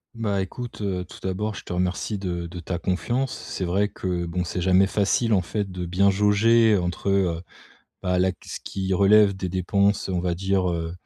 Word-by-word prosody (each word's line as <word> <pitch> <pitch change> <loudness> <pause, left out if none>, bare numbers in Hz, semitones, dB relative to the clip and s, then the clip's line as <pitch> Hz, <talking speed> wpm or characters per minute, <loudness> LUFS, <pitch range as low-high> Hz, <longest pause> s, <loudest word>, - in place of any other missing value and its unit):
Bah, 100 -4 -1
écoute, 120 +4 -6
heu, 90 -3 -2
tout - - -12
d'abord 105 +3 -2
je - - -8
te - - -9
remercie 90 +4 -1
de 85 -3 -3
de 90 +1 -8
ta 85 +1 -4
confiance. 95 +10 -1 0.2
C'est 95 - -4
vrai 100 +4 +1
que 90 -2 -3
bon 90 +1 -2
c'est 90 - -4
jamais 95 +2 +4
facile 105 +3 +1
en 95 - +4
fait, 100 +1 -3
de 90 -1 -4
bien 95 +3 +3
jauger 105 +2 +4
entre, 90 +2 -2
heu, 90 -4 +1 0.6
bah, 90 0 +1
là 95 0 +2
ce - - -6
qui 95 -1 -3
relève 100 +1 +5
des 95 -1 -3
dépenses 100 +3 +1
on 90 -1 -1
va 90 -1 0
dire, 95 0 0
heu 85 0 -3
95 Hz, 200 wpm, -24 LUFS, 90-100 Hz, 0.6 s, relève